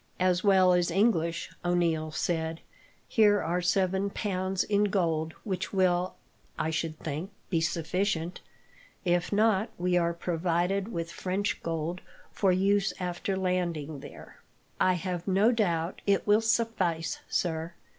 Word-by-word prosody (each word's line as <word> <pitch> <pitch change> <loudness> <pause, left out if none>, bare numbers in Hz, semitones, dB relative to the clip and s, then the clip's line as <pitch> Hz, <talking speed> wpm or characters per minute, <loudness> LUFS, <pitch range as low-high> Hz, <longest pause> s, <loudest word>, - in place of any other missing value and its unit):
"As 185 -1 +2
well 190 -3 +5
as 175 -1 +2
English," 170 -3 +1
O'Neil 170 -3 +1
said. 160 0 -2 0.5
"Here 210 -2 +4
are 175 +1 -1
seven 190 +2 +1
pounds 190 -2 -1
in 205 0 +2
gold, 165 -5 0
which 190 -3 -3
will, 185 -2 +1 0.4
I 160 - -1
should 160 -1 -2
think, 155 +5 -4 0.2
be 165 -3 +2
sufficient. 170 +1 -1 0.6
If 175 0 +1
not, 215 0 +3
we 180 0 +1
are 170 -1 +1
provided 175 +4 -1
with 165 -4 -4
French 190 +4 -2
gold, 165 +2 -3 0.3
for 195 -2 +2
use 195 +2 +2
after 180 +2 -2
landing 170 -6 -1
there." - - -12 0.4
"I 185 - +4
have 180 0 -3
no 200 +5 +4
doubt 175 -7 0
it 200 -1 +2
will 210 +1 +4
suffice, 215 -7 0
sir. 165 0 -1
180 Hz, 135 wpm, -29 LUFS, 165-195 Hz, 0.6 s, well